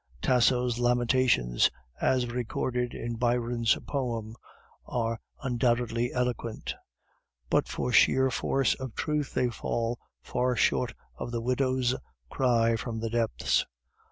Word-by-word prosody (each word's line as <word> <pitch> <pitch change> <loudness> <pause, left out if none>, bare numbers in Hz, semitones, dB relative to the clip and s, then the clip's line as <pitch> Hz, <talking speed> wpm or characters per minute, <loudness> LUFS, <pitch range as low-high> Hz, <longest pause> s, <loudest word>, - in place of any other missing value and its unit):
Tasso's 125 - +2
lamentations 120 - +3 0.3
as 130 -1 +2
recorded 125 0 -2
in 120 -1 -4
Byron's 120 -1 +1
poem 115 -5 -3 0.5
are 115 -2 -1 0.2
undoubtedly 120 -1 +1
eloquent, 125 -2 -2 0.8
but - - +3
for 125 - -2
sheer 130 +2 +5
force 135 +2 +1
of 130 -3 -7
truth 150 -2 -2
they 125 - +2
fall 115 +1 -2 0.2
far 125 0 0
short - - +1 0.2
of - - -5
the 120 - -1
widow's 130 +1 +1 0.4
cry 115 -3 +3
from 115 0 -4
the 115 0 -3
depths. 115 -1 +1
120 Hz, 115 wpm, -28 LUFS, 115-125 Hz, 0.8 s, sheer